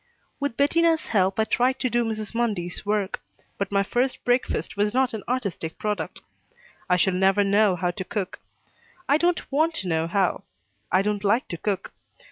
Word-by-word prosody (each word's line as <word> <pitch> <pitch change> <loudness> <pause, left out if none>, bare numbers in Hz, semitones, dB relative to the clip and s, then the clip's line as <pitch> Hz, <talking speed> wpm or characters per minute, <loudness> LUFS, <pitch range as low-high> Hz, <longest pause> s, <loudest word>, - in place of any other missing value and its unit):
With 285 -4 -2
Bettina's 325 +3 +3
help 195 -1 +2
I - - +5
tried 250 +4 +1
to 255 - +2
do 240 -1 +1
Mrs. 215 -2 -4
Mundy's 205 -7 -1
work, 205 -2 -1 0.4
but 200 0 -2
my 200 0 +3
first 250 +6 -1
breakfast 245 +1 0
was 210 +2 0
not 260 -1 +2
an 220 - -4
artistic 200 -10 -2
product. 210 -1 -3 0.7
I 180 - +4
shall 185 +2 +2
never 190 +2 +3
know 200 -1 +3
how 180 0 0
to 185 - -5
cook. 195 -1 -4 0.7
I 285 - +4
don't 345 -1 0
want 315 +4 +2
to 190 - -4
know 160 -1 0
how. 190 +1 +1 0.5
I 185 +1 +4
don't 210 0 -1
like 215 +5 +2
to 170 - -4
cook. 195 +1 -3
210 Hz, 180 wpm, -25 LUFS, 190-245 Hz, 0.7 s, I